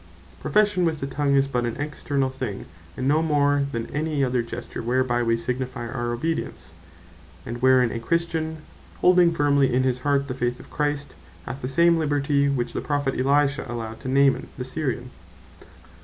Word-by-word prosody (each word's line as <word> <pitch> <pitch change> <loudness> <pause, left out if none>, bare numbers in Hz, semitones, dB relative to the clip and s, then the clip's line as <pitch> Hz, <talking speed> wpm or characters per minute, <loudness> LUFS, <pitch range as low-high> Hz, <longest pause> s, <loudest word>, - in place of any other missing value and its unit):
Profession 210 -3 +2
with 160 -3 0
the 135 - -3
tongue 140 0 0
is 135 0 +3
but 125 -3 -1
an 120 -1 -2
externall 145 -2 -2
thing, 130 -7 -5 0.3
and 130 - -1
no 150 +3 +3
more 145 -3 +2
then 115 -2 -3
any 150 -1 0
other 125 -2 +1
gesture 120 +1 -6
whereby 120 +1 +1
we 115 -1 +2
signifie 125 +1 -3
our 120 0 -3
obedience; 155 - -3 0.7
and 120 +1 -6
wherein 130 -2 +4
a 115 - -3
Christian, 160 +3 -2 0.4
holding 180 -1 +5
firmely 145 -4 +3
in 125 +1 +2
his 130 -1 +1
heart 140 +1 +1
the 130 - -3
Faith 125 -1 -2
of - - -14
Christ, 145 - -2 0.3
hath 135 - -6
the 125 - -3
same 170 +5 +4
liberty 145 -2 +1
which 125 -3 -1
the - - -2
Prophet 145 -2 -1
Elisha 140 +2 +2
allowed 115 -2 -5
to - - -8
Naaman 135 +1 +3
the 125 - -4
Syrian. 130 -2 -3
135 Hz, 175 wpm, -24 LUFS, 125-145 Hz, 0.7 s, holding